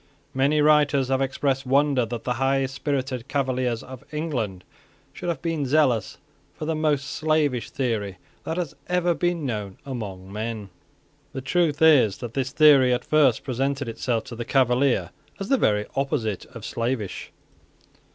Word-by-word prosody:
Many 140 +3 +2
writers 145 -3 +4
have 135 0 +1
expressed 135 0 0
wonder 135 -2 +2
that 115 0 -5
the 125 - 0
high 135 0 +2
spirited 135 -2 -3
Cavaliers 130 -4 -1
of 130 -1 -10
England 125 - -3 0.5
should - - -5
have 160 -6 -3
been 165 -3 -1
zealous 130 -7 +2 0.4
for 155 - -5
the 160 - 0
most 150 -3 0
slavish 150 -4 0
theory 110 -7 -2 0.3
that 160 - -3
has 170 -6 -3
ever 180 -1 +2
been 175 -2 -1
known 105 -6 -4
among 100 -8 -6
men. 110 -1 -4 0.6
The 135 - -4
truth 155 +2 +1
is 135 -11 +5
that 120 -2 -7
this 130 -1 -1
theory 140 -4 +6
at 125 0 0
first 145 -6 +3
presented 135 +1 -2
itself 115 0 -1
to 120 - -9
the 120 - -4
Cavalier 125 -7 +2 0.3
as 195 - -5
the 270 - +4
very 105 0 +2
opposite 135 - -1
of - - -10
slavish. 115 -5 -3
135 Hz, 155 wpm, -24 LUFS, 115-150 Hz, 0.6 s, theory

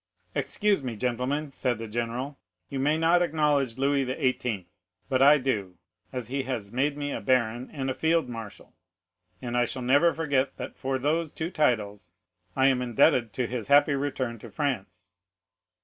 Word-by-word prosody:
"'"Excuse 205 -6 +1
me, 125 -4 -4
gentlemen," 125 +6 -2
said 125 -3 -1
the 115 0 -6
general; 120 +5 -3 0.3
"you 135 - -3
may 150 +3 +2
not 165 +2 +4
acknowledge 145 -7 +1
Louis 140 +1 +2
XVIII., 125 - -1 0.4
but 130 -1 +2
I 145 +2 +8
do, 105 -10 -2 0.3
as 125 -3 -5
he 135 +1 -1
has 120 -6 -4
made 140 +4 0
me 145 -1 -3
a - - -4
baron 120 -1 +1
and 135 -3 -4
a 130 - 0
field 160 0 +1
marshal, 110 -4 -9 0.7
and 120 -1 -3
I 120 0 +3
shall 130 +1 -5
never 145 +7 +4
forget 140 -5 0
that 125 - -6
for 135 0 -2
these 155 +4 0
two 160 +2 -4
titles 105 - 0 0.4
I 130 - +3
am 130 -2 +3
indebted 120 -1 +3
to 125 - -1
his 120 -1 -4
happy 145 +1 +5
return 130 -4 -2
to - - -10
France." 95 - -3
130 Hz, 170 wpm, -27 LUFS, 120-145 Hz, 0.7 s, I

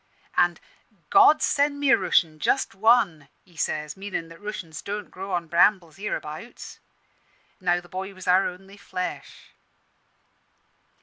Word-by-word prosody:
An' 175 -1 +3 0.5
'God 390 -6 +6
send 285 0 +1
me 285 -1 +3
a - - +8
Rooshian 165 -4 +1
just 265 - +1
one!' 195 - +3 0.2
he 175 - -23
says, 150 -1 -2
meanin' 190 -4 -5
that 165 +2 -14
Rooshians 185 -7 -7
don't 205 0 -5
grow 195 +1 -7
on 175 -2 -1
brambles 170 0 +2
hereabouts. 195 +1 -6 0.8
Now 175 -2 +1
the 175 - -15
boy 190 +2 -5
was 185 -1 -11
our 185 +2 +4
only 195 +2 -10
flesh. 185 -2 -6
185 Hz, 135 wpm, -25 LUFS, 170-210 Hz, 0.8 s, a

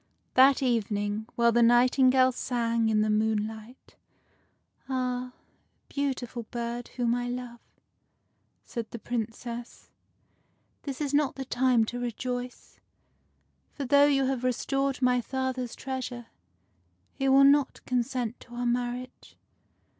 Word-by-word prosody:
That 270 +1 +6
evening, 215 -3 -1
while 235 0 +4
the 235 +1 +3
nightingale 255 +2 +5
sang 235 -2 0
in 215 -1 +2
the 215 - +1
moon 215 0 +1
light,— 220 +3 -11 0.5
" - - -38
Ah! 250 -1 -2 0.6
beautiful 250 -5 -3
bird, 235 0 -4
whom 240 -2 +1
I 245 0 -2
love," 245 -1 -6 1.1
said 230 -3 -5
the - - -7
Princess, 235 +1 -6 0.5
" - - -43
this 275 0 -5
is 290 -1 -2
not 290 -1 +2
the 270 - -5
time 250 -2 +2
to 245 +2 -5
rejoice; 245 +1 -5 0.9
for, 280 - -5
though 285 +2 +6
you 275 -2 +2
have 260 -2 -1
restored 270 +2 -1
my 250 0 +3
father's 260 -1 -3
treasure, 255 -2 -5 0.9
he 270 0 0
will 270 +1 +7
not 280 0 +3
consent 250 -1 -2
to 240 - -13
our 245 0 -3
marriage." 245 +1 -3
245 Hz, 130 wpm, -28 LUFS, 235-260 Hz, 1.1 s, will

